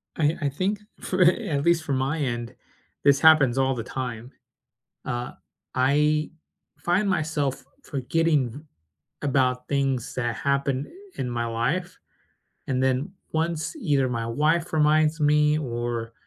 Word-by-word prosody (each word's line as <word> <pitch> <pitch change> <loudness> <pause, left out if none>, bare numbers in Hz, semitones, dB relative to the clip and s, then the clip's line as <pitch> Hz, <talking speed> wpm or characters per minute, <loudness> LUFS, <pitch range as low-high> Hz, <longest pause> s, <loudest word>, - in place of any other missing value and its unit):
I 155 0 +1
I 140 - +1
think 190 +8 -1 0.2
for 185 0 -1
a 175 0 +4
at 140 -1 0
least 170 -1 +3
from 140 -4 -1
my 135 +4 -1
end, 120 -2 -3 0.5
this 140 0 +5
happens 150 -6 +6
all 135 0 +2
the 115 - -4
time. 125 -1 -5 0.7
Uh, 120 0 -3 0.4
I 150 +4 +2 0.5
find 190 +4 +1
myself 150 -6 -1 0.2
forgetting 145 0 0
v 130 - -9 0.6
about 130 -3 +1
things 135 -4 -1
that 120 -3 -2
happened, 140 -1 0
eh, - - -17 0.3
in 125 - -3
my 120 -1 -2
life, 130 +11 -2 0.7
and 130 -1 0
then 130 +6 0 0.2
once 160 - -1
either 145 - +1
my 115 -2 -2
wife 155 +8 +1
reminds 155 +1 +3
me 150 0 +3
or 120 -4 -3
140 Hz, 140 wpm, -25 LUFS, 125-155 Hz, 0.7 s, happens